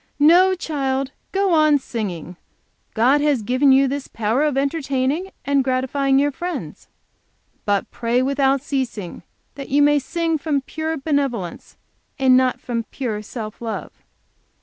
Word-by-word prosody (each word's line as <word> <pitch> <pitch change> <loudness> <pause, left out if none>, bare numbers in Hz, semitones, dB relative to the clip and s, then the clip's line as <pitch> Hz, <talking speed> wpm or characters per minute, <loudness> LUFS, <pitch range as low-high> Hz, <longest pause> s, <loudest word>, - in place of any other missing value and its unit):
"No 355 +6 +5
child, 275 -5 -2 0.2
go 390 -2 +1
on 310 -2 +5
singing; 190 - -5 0.6
God 255 +6 +4
has 290 -6 +1
given 255 +5 +3
you 270 +1 +5
this 280 +1 -4
power 230 +5 0
of 295 -3 0
entertaining 280 +3 -1 0.2
and, 280 -1 +2
gratifying 265 +1 +1
your 290 +1 +2
friends. 350 +5 -6 0.8
But, 205 -1 0
pray 240 +2 0
without 275 0 +1
ceasing, 245 -10 -4 0.3
that 275 -1 -8
you 285 +2 +4
may 295 0 +4
sing 330 +3 -1
from 285 -2 0
pure 315 +3 -4
benevolence 270 - -2 0.4
and 260 -2 +4
not 255 -1 +2
from 230 -2 -3
pure 220 -3 -4
self 215 0 -8
love." 225 -2 -5
270 Hz, 140 wpm, -21 LUFS, 250-295 Hz, 0.8 s, No